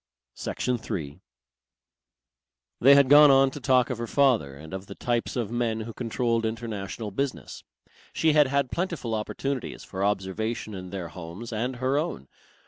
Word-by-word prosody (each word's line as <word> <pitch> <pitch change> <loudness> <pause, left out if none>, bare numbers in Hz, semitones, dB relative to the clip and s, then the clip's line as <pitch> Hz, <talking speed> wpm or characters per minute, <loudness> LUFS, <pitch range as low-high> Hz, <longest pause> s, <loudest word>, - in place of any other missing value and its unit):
Section 125 -1 -2
3 75 -9 -5 1.6
They 140 +3 +7
had 140 -1 +6
gone 145 +2 +8
on 135 0 +5
to 145 - -7
talk 130 -1 +3
of 120 - -4
her 120 - -3
father 120 - +2
and 80 +5 -11
of 95 +1 -6
the 100 - -9
types 120 -1 -1
of 115 -4 -2
men 115 -2 -1
who 115 +1 -7
controlled 115 0 -1
international 110 -2 -4
business. 135 +7 -4 0.5
She 160 -1 +2
had 150 -2 +5
had 140 -1 0
plentiful 170 -10 -2
opportunities 125 +4 -3
for 95 0 -4
observation 105 +3 -2
in 90 -1 -7
their 90 -3 -5
homes 90 +8 -8
and 125 +4 -2
her 130 +3 +1
own. 70 - -4
115 Hz, 160 wpm, -26 LUFS, 100-130 Hz, 1.6 s, gone